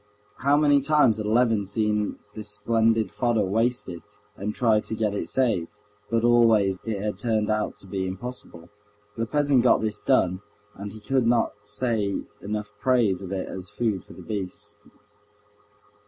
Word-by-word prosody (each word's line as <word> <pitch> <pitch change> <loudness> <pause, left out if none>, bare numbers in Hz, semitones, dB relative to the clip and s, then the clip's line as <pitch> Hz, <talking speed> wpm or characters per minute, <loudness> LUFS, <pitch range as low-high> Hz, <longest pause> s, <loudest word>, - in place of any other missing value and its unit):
How 140 +2 +3
many 145 -2 +4
times 140 -6 +4
had 105 -1 -3
Levin 115 -1 +3
seen 105 +1 -1 0.2
this 105 -1 -5
splendid 110 -1 +1
fodder 110 0 +1
wasted, 110 -3 -1 0.3
and 105 +2 -4
tried 110 -3 +3
to 110 - -3
get 105 -2 0
it 105 - -3
saved; 115 -11 +1 0.4
but 115 -1 +1
always 115 -5 +4
it 110 -3 -2
had 105 -1 -3
turned 110 -1 0
out 110 0 -1
to - - -13
be 95 0 -3
impossible. 95 -4 -7 0.5
The 115 0 -2
peasant 145 -1 +3
got 125 - +4
this 110 -1 -2
done, 95 +1 +2 0.3
and 100 +1 -7
he 110 - -11
could 130 0 +1
not 120 -1 +2
say 105 -2 -1 0.3
enough 105 0 -4
in - - -36
praise 115 -8 +2
of 95 -1 -7
it 95 -1 -3
as 95 0 -5
food 105 -3 -1
for - - -14
the - - -11
beasts. 105 0 -4
110 Hz, 170 wpm, -25 LUFS, 100-120 Hz, 0.5 s, many